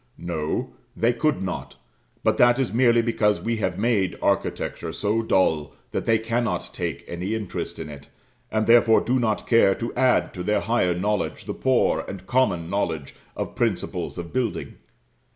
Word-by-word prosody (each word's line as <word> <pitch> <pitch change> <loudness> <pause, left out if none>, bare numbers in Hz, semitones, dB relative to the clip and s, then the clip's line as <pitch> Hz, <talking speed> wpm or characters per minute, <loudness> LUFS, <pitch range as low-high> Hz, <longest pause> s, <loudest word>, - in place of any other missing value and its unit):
No, 80 -3 -3 0.3
they 120 +2 +3
could 150 -2 0
not; 95 -2 -5 0.5
but - - +2
that 120 0 +5
is 135 -4 -1
merely 120 -1 +4
because 105 -3 +1
we 115 0 -2
have 95 -4 -1
made 100 -4 +1
architecture 80 - -1
so 105 +6 0
dull 80 -9 +1 0.2
that - - -3
they 115 - +5
cannot 115 +2 -2
take - - -4
any 90 +5 -3
interest 105 -4 -4
in 80 - -6
it, 70 -2 -11 0.4
and, 110 0 +1
therefore, 115 -1 +6
do 130 +2 +1
not 110 -3 0
care 115 -5 +4
to 115 - -4
add 130 -1 +2
to 90 - -6
their 105 +4 +1
higher 110 -7 +1
knowledge 105 +3 -1
the - - -3
poor - - +2
and 95 -1 -7
common 95 -8 +1
knowledge 80 -7 -2 0.2
of - - -4
principles - - -2
of 85 -1 -7
building. 125 -2 -2
105 Hz, 170 wpm, -24 LUFS, 90-115 Hz, 0.5 s, therefore